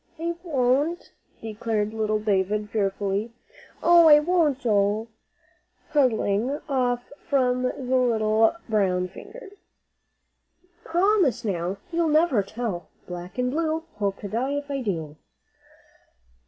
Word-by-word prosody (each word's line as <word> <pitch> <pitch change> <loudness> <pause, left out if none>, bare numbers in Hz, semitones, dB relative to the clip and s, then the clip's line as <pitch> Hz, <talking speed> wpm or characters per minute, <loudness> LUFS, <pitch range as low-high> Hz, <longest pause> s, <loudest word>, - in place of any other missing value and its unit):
"I 335 +1 -1
won't," 290 +2 0 0.3
declared 220 -1 -2
little 215 -1 0
David, 210 0 -1
fearfully. 200 +1 -1 0.5
"Oh, 340 -1 +7
I 295 -1 +9
won't, 315 -3 +2
Joe," 210 0 +1 0.8
huddling 255 -1 +1
off 245 -3 -1 0.2
from 250 -3 +2
the 255 - +1
little 230 -4 +2
brown 185 -5 +1
fingers. 420 - -12 1.3
"Promise, 345 - +2
now, 185 -1 -2
you'll 335 -1 +1
never 305 -7 +3
tell, 200 -3 -5 0.2
black 180 +1 -8
and 250 0 0
blue, 320 +1 -1
hope 200 -2 -1
to 205 - -5
die 245 +7 -2
if 285 0 -4
I 275 -1 -2
do." 160 -9 -4
240 Hz, 115 wpm, -25 LUFS, 205-290 Hz, 1.3 s, I